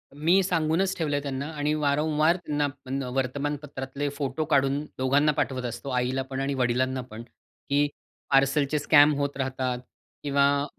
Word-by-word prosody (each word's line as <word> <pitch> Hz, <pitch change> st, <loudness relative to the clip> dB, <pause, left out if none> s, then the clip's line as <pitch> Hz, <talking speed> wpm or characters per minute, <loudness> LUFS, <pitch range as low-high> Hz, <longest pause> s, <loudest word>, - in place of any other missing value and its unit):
मी 165 Hz, +6 st, +3 dB
सांगूनच 175 Hz, +1 st, +1 dB
ठेवलंय 145 Hz, -3 st, 0 dB
त्यांना 140 Hz, -1 st, -4 dB
आणि 150 Hz, +1 st, 0 dB
वारंवार 155 Hz, +2 st, +2 dB
त्यांना 150 Hz, -5 st, -1 dB, 0.2 s
पण 135 Hz, +1 st, -3 dB
वर्तमानपत्रातले 140 Hz, +1 st, -3 dB
फोटो 145 Hz, +2 st, -2 dB
काढून 140 Hz, 0 st, +2 dB, 0.2 s
दोघांना 140 Hz, +4 st, +3 dB
पाठवत 130 Hz, -3 st, -2 dB
असतो. 120 Hz, +3 st, -5 dB
आईलापण 130 Hz, +1 st, -1 dB
आणि 140 Hz, +1 st, -1 dB
वडिलांनापण, 125 Hz, -2 st, -1 dB
की 145 Hz, +4 st, -3 dB, 0.4 s
पार्सलचे 135 Hz, +2 st, +3 dB
स्कॅम 145 Hz, 0 st, +6 dB
होत 140 Hz, -1 st, -2 dB
राहतात 130 Hz, -2 st, -2 dB, 0.4 s
किंवा 140 Hz, 0 st, +2 dB
140 Hz, 130 wpm, -26 LUFS, 130-150 Hz, 0.4 s, स्कॅम